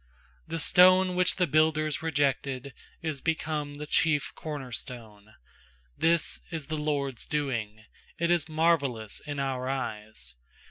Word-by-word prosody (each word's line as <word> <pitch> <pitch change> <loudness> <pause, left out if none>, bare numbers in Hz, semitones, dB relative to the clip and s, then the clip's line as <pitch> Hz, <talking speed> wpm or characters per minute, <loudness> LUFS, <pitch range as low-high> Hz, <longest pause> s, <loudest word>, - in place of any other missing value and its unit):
stone 185 +2 +6
which 180 0 +3
the 180 - +2
builders 155 -1 +2
re 160 0 -2
jected 140 -2 0 0.3
Is 155 -4 -2
become 155 -3 -2
the 150 +1 -6
chief 150 -1 +2
corner 145 -5 -6
stone. 110 -4 -8 0.6
is 165 0 +2
the 160 -3 -4
LORD'S 145 -5 -2
doing; 115 -8 -2 0.3
It 170 +1 +1
is 170 -2 +2
marvellous 140 -9 +1
in 145 -1 -6
our 130 -2 -2
eyes. 105 - -3
145 Hz, 125 wpm, -28 LUFS, 130-160 Hz, 0.6 s, stone